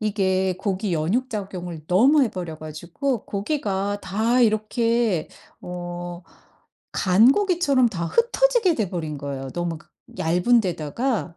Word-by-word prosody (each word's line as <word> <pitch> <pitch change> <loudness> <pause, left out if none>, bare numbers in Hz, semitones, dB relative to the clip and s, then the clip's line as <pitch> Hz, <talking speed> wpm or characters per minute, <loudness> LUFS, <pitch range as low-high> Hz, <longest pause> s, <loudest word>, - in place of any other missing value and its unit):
이게 190 -3 +1
고기 195 0 -2
연육 195 +12 0
작용을 180 -6 -6
너무 260 - +5
해 240 - +1
버려 175 -4 -6
가지고 170 - -4
고기가 205 -3 -2
다 220 +6 +1
이렇게 220 -3 +1 0.3
어 175 0 -6 0.7
간 205 +8 +5
고기처럼 335 - +2
다 170 -3 -3
흩어지게 475 - +2
돼 210 -5 -1
버린 160 -5 -4
거예요. 135 -1 -5
너무 170 +1 -3
그 - - -22 0.3
얇은 180 +9 +3
데다가 180 - -2
195 Hz, 260 characters per minute, -23 LUFS, 175-240 Hz, 0.7 s, 너무